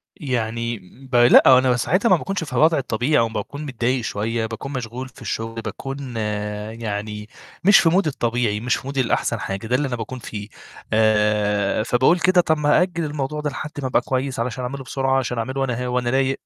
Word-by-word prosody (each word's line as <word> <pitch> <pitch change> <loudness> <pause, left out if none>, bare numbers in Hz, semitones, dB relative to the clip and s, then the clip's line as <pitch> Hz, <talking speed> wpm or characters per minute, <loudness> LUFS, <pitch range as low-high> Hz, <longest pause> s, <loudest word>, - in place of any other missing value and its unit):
يعني 115 -3 -2 0.3
ب - - -1
لأ، 120 0 +7
هو 130 - +9
أنا 125 -1 +3
ساعتها 185 - +1
ما 185 - +7
باكونش 185 +1 -3
في 140 - -8
الوضع 155 +6 +4
الطبيعي، 130 +2 0
أو 115 - +3
ما - - -12
باكون 140 +8 -5
متضايق 125 -1 -1
شوية، 110 +2 -2
باكون 115 +5 -6
مشغول 125 +1 -5
في 120 - -18
الشغل، 115 0 -4
باكون 130 +3 -6 0.6
يعني 105 -1 -4 0.4
مش 200 +2 +7
في 165 - +4
مودي 180 -1 +2
الطبيعي، 120 -5 -1
مش 120 +3 0
في - - -7
مودي 140 -1 0
الأحسن 120 - 0
حاجة، 95 +3 -4
ده 125 - +1
اللي 140 +2 0
أنا 125 - -2
باكون 120 +2 -6
فيه. 105 -3 -7 0.5
آآ 105 -1 +2
فباقول 130 +9 +3
كده: 180 +1 +4
"طب 160 -3 0
أأجل 170 +3 +2
الموضوع 150 0 -3
ده 150 - -1
لحد 150 +2 -6
ما 130 - -1
أبقى 125 - +2
كويس، 130 0 -2
علشان 125 +1 -3
أعمله 135 +2 -5
بسرعة، 135 +1 0
عشان 125 -2 -3
أعمله 130 +4 -2
وأنا 125 -2 -1
ه - - -3
وأنا 125 -1 0
رايق." 135 +1 +1
125 Hz, 205 wpm, -22 LUFS, 115-140 Hz, 0.6 s, هو